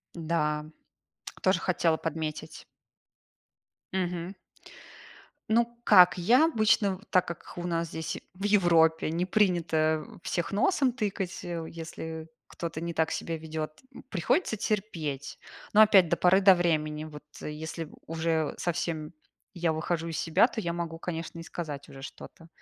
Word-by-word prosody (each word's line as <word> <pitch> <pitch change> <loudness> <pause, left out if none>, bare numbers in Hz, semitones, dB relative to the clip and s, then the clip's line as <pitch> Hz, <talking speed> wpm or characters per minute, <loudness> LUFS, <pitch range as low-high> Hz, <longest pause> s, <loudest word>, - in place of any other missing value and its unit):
Да, 155 -2 -1 0.8
тоже - - +3
хотела 165 -2 +1
подметить. 160 -1 -5 1.3
Мгм. 180 0 -2 1.1
Ну, 230 +2 +4 0.2
как, 180 -3 +7
я 240 - +5
обычно, 215 - +2
в 200 - -19
так 185 -2 +3
как 170 - -8
у 175 0 -3
нас 170 -1 -1
здесь 160 0 -4 0.2
в 190 - -10
Европе 165 -6 +4
не 170 +2 0
принято 165 -6 +2 0.2
всех 175 0 -2
носом 260 - +2
тыкать, 200 -6 -3
э, 175 -1 -4
у 160 - -6
если 160 -1 -7 0.2
кто-то 165 -2 -5
не 170 0 -3
так 160 -1 +1
себя 165 -1 -3
ведет. 155 -1 -6 0.3
Приходится 220 - +1
терпеть. 170 - -3 0.3
Но 215 - +8
опять 195 -6 +7
до 170 - +3
поры 185 +2 +5
до 190 -1 +8
времени. 155 -3 0
Вот 150 -1 -10 0.2
если 155 +1 -5 0.2
уже 160 -1 -1
совсем 170 -2 -2 0.4
я 170 -3 0
выхожу 165 +1 -2
из 165 - -4
себя, 165 +7 +4
то 230 - -5
я 170 -4 -2
могу, 170 -1 -4
конечно, 165 -1 -5
и - - -7
сказать 150 -5 -6
уже 135 - -11
что-то. 165 +4 -11
170 Hz, 145 wpm, -28 LUFS, 160-185 Hz, 1.3 s, Но